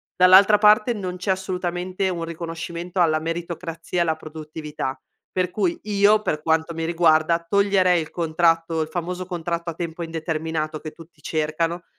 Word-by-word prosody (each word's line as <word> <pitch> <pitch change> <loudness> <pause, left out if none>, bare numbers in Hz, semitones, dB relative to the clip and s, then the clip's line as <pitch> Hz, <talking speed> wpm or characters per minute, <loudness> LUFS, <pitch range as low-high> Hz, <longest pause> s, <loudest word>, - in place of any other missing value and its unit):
Dall'altra 190 +3 +7
parte, 215 +3 +5
non 185 -4 -5
c'è 185 +2 -5
assolutamente 185 0 -2
un 170 -2 -3
riconoscimento 170 +2 -4
alla 155 -2 +3
meritocrazia 165 +1 -4
e - - +4
alla 160 -2 +1
produttività, 155 -4 -6 0.3
per 180 -1 -1
cui, 185 -4 0
io 210 +1 +3
per 155 -7 -2
quanto 160 +1 +1
mi 165 0 -3
riguarda, 165 0 +3
toglierei 195 -2 +3
il 155 - -7
contratto 165 0 +1
il 155 - -2
famoso 180 +2 -4
contratto 170 -1 -3
a - - -4
tempo 170 0 -5
indeterminato, 160 -1 -3
che 155 - -7
tutti 165 -1 -17
cercano, 160 +3 -2
170 Hz, 155 wpm, -23 LUFS, 160-180 Hz, 0.3 s, Dall'altra